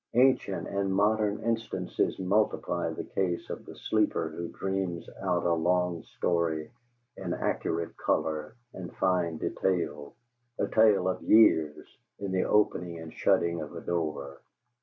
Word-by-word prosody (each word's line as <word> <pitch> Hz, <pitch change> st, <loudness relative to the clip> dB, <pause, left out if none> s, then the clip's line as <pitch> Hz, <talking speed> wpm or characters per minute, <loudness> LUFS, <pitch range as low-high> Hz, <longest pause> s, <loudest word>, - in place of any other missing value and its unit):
Ancient 125 Hz, -6 st, +3 dB
and 100 Hz, -1 st, -1 dB
modern 105 Hz, +2 st, +2 dB
instances 115 Hz, 0 st, -1 dB
multiply 100 Hz, +4 st, 0 dB
the -, -, -5 dB
case 90 Hz, -3 st, -2 dB
of -, -, -7 dB
the -, -, -9 dB
sleeper -, -, 0 dB
who 85 Hz, -, -5 dB
dreams 95 Hz, -3 st, -3 dB
out 90 Hz, -3 st, 0 dB
a 85 Hz, -, +3 dB
long 90 Hz, 0 st, +1 dB
story 80 Hz, -3 st, -1 dB, 0.5 s
in -, -, -3 dB
accurate 85 Hz, 0 st, -2 dB
color 75 Hz, +4 st, -1 dB, 0.2 s
and 90 Hz, -2 st, -7 dB
fine 90 Hz, -3 st, +1 dB
detail, 75 Hz, -5 st, -2 dB, 0.4 s
a -, -, 0 dB
tale 105 Hz, -4 st, +4 dB
of 95 Hz, -, -1 dB
years, 80 Hz, -9 st, +4 dB, 0.3 s
in 100 Hz, -1 st, -4 dB
the 95 Hz, 0 st, +1 dB
opening 90 Hz, -5 st, +1 dB
and 80 Hz, -1 st, -9 dB
shutting 85 Hz, -1 st, +2 dB
of 75 Hz, -, -7 dB
a -, -, -6 dB
door. 75 Hz, -5 st, -3 dB
90 Hz, 140 wpm, -29 LUFS, 80-100 Hz, 0.5 s, tale